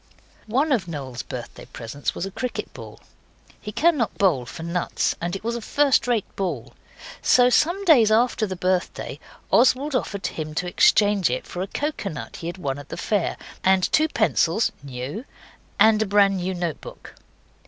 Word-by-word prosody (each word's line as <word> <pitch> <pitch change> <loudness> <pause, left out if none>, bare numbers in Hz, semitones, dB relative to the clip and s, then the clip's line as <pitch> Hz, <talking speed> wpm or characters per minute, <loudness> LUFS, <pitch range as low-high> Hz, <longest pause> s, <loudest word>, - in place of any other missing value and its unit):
One 275 +8 +1
of 220 -10 +1
Noel's 135 -7 -5
birthday 120 -2 -8
presents 125 +3 -5
was 175 - -3
a 195 - -6
cricket 250 +5 -4
ball. - - -11 0.6
He 210 - -6
cannot 295 -3 +1
bowl 150 -11 +2
for 165 +4 -8
nuts, 170 +1 -1
and 175 +2 -2
it 195 - -7
was 235 +1 -2
a 235 - -4
first 280 +2 +2
rate 235 -5 +1
ball. 160 - -3 0.5
So 250 0 +5
some 355 +9 +2
days 255 - +6
after 225 0 +2
the 190 - -4
birthday 180 0 -2 0.3
Oswald 265 +4 +4
offered 205 -6 -2
him 155 -1 -4
to 180 - -1
exchange 205 - +4
it 125 +1 -3
for 180 - -6
a 190 - -2
coconut 200 - -4
he 165 - -6
had 175 - -5
won 140 -6 -3
at 145 - -12
the - - -6
fair, 205 -5 -1 0.3
and 190 0 +4
two 310 0 +4
pencils 215 - +1
(new), 140 - -6 0.6
and 215 +1 +5
a 220 - +1
brand 200 -1 +4
new 185 +1 -2
note 175 -4 -3
book. - - -11
195 Hz, 175 wpm, -23 LUFS, 165-235 Hz, 0.6 s, days